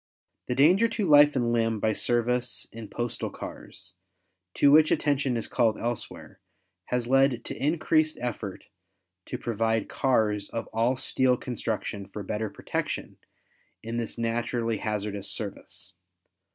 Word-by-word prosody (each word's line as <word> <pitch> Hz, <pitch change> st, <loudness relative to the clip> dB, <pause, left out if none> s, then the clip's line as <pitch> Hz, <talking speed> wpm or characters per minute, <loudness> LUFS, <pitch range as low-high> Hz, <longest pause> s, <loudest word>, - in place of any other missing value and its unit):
The 125 Hz, -, -1 dB
danger 180 Hz, -, +5 dB
to 215 Hz, -4 st, -2 dB
life 145 Hz, -1 st, +7 dB
and 120 Hz, -2 st, +1 dB
limb 115 Hz, -2 st, +1 dB
by 110 Hz, +1 st, +1 dB
service 120 Hz, +2 st, 0 dB
in 115 Hz, -1 st, -8 dB
postal 120 Hz, +3 st, -3 dB
cars, -, -, -9 dB, 0.6 s
to 140 Hz, -, +5 dB
which 155 Hz, +1 st, +7 dB
attention 140 Hz, -4 st, +1 dB
is 115 Hz, -, -3 dB
called 115 Hz, -4 st, +2 dB
elsewhere, 120 Hz, -1 st, -5 dB, 0.5 s
has 125 Hz, -1 st, -1 dB
led 135 Hz, -1 st, +3 dB
to -, -, -4 dB
increased 155 Hz, 0 st, +2 dB
effort 115 Hz, -5 st, -5 dB, 0.6 s
to -, -, -4 dB
provide 115 Hz, -1 st, -1 dB
cars 105 Hz, -6 st, +1 dB
of 115 Hz, 0 st, -4 dB
all 115 Hz, +3 st, +1 dB
steel 130 Hz, -1 st, +2 dB
construction 110 Hz, -5 st, -4 dB
for 100 Hz, +1 st, -7 dB
better 105 Hz, +3 st, -3 dB
protection -, -, -4 dB, 0.7 s
in 115 Hz, +1 st, -4 dB
this 115 Hz, 0 st, -3 dB
naturally 115 Hz, 0 st, -1 dB
hazardous 105 Hz, -2 st, -2 dB
service. 105 Hz, -3 st, -6 dB
120 Hz, 135 wpm, -27 LUFS, 110-130 Hz, 0.7 s, life